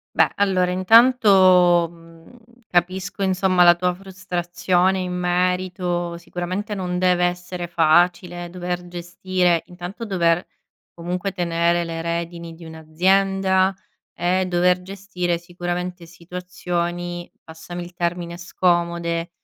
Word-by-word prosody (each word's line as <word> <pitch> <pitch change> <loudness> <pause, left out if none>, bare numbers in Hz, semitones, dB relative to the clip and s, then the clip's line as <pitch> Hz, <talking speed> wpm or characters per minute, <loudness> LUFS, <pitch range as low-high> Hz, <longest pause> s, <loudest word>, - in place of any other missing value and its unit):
Beh, - - +4
allora 185 -3 +2
intanto, 185 -4 +5
mhmm, 165 +5 -17 0.3
capisco 180 +2 -1
insomma 185 -1 +2
la 175 0 +8
tua 180 +1 -1
frustrazione 185 0 -1
in 180 -1 -3
merito. 180 -1 -1
Sicuramente 180 +5 -4
non 180 -2 -3
deve 180 -1 +3
essere 175 0 -5
facile 175 +1 +2
dover 180 0 -5
gestire 175 0 0
intanto 180 +6 -8
dover 175 -3 +1 0.5
comunque 180 +3 -3
tenere 170 -1 +1
le 165 0 -5
redini 170 0 -4
di 165 +1 -13
un'azienda, 190 +4 +1 0.5
e 185 +1 +1
dover 180 0 +2
gestire 180 -2 -3
sicuramente 175 +1 -5
situazioni, 175 0 -5
passami 165 +2 -8
il 175 - -12
termine, 170 -1 -3
scomode 170 -1 0
180 Hz, 110 wpm, -22 LUFS, 175-185 Hz, 0.5 s, la